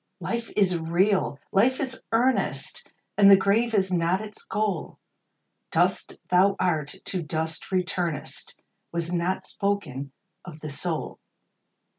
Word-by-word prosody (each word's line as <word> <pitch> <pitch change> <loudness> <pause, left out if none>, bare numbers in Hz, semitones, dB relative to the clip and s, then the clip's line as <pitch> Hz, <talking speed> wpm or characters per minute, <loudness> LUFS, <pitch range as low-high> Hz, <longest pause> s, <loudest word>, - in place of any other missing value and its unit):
Life 235 -1 -3
is 185 -4 +3
real! 175 -1 +1
Life 245 +7 +3
is 260 -3 -3
earnest! 245 +3 0 0.3
And 200 -1 +8
the 195 - +10
grave 220 +4 +2
is 190 -2 +2
not 175 +2 +2
its 215 0 -7
goal; 210 -6 -2 0.7
Dust - - +1
thou 190 +2 +4
art, 155 -6 0
to 190 -3 -2
dust 160 +2 -3
returnest, 180 -3 -2 0.4
Was 170 0 -2
not 175 +2 0
spoken 170 -10 -2 0.3
of 160 -4 -10
the 155 - -5
soul. 160 +2 -3
185 Hz, 125 wpm, -26 LUFS, 165-205 Hz, 0.7 s, the